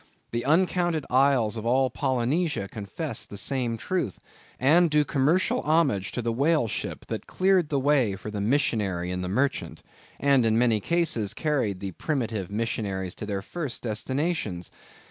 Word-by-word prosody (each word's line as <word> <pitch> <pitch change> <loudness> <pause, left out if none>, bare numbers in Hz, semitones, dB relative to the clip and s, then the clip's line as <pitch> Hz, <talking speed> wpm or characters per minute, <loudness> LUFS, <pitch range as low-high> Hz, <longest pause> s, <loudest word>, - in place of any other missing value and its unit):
The 120 0 -2
uncounted 175 0 +2
isles 130 -4 +3
of 110 - -5
all 130 +1 +3
Polynesia 130 - 0
confess 100 -2 -4
the 100 - -9
same 125 -1 -1
truth, 175 - -2 0.4
and 165 +6 +5
do 150 -1 +3
commercial 145 +8 +2
homage 150 - +2
to 125 - -2
the 115 - 0
whale 140 +2 +2
ship, - - -5
that - - -5
cleared 185 -4 +2
the 140 - +1
way 135 -7 +2
for 100 +2 -7
the 105 -1 -3
missionary 100 -7 0
and 90 0 -3
the 90 - -3
merchant, 130 +8 -1 0.4
and 140 -3 +4
in 110 -1 +2
many 115 -2 +3
cases 115 - 0
carried 125 -11 -1
the 100 -1 -4
primitive 110 - -2
missionaries 100 -4 -2
to 105 - -7
their 100 -2 -3
first 150 -5 -5
destinations. 120 - -2
125 Hz, 160 wpm, -26 LUFS, 105-150 Hz, 0.4 s, and